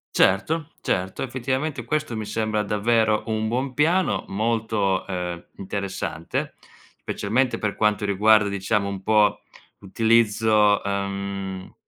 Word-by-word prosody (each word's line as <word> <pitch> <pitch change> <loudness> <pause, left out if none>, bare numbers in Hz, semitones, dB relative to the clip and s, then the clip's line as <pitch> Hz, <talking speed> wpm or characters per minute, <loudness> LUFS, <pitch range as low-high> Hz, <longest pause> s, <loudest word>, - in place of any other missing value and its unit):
Certo, 150 - +2
certo. 95 +5 -2
Effettivamente 130 +2 -2
questo 150 -3 -2
mi 110 -1 -4
sembra 110 0 -1
davvero 110 +1 +1
un 110 0 -1
buon 130 +3 -2
piano, 170 +6 +1
molto, 110 -2 0
ehm, 90 -2 -4
interessante, 95 -4 -4 0.5
specialmente 115 +3 0
per 105 -2 -2
quanto 105 -1 +1
riguarda, 105 +1 +4
diciamo, 100 +1 0
un 100 -1 -5
po' 105 0 +3 0.4
l'utilizzo, 110 0 +3
uhm, 100 -1 -4
105 Hz, 110 wpm, -24 LUFS, 100-115 Hz, 0.5 s, riguarda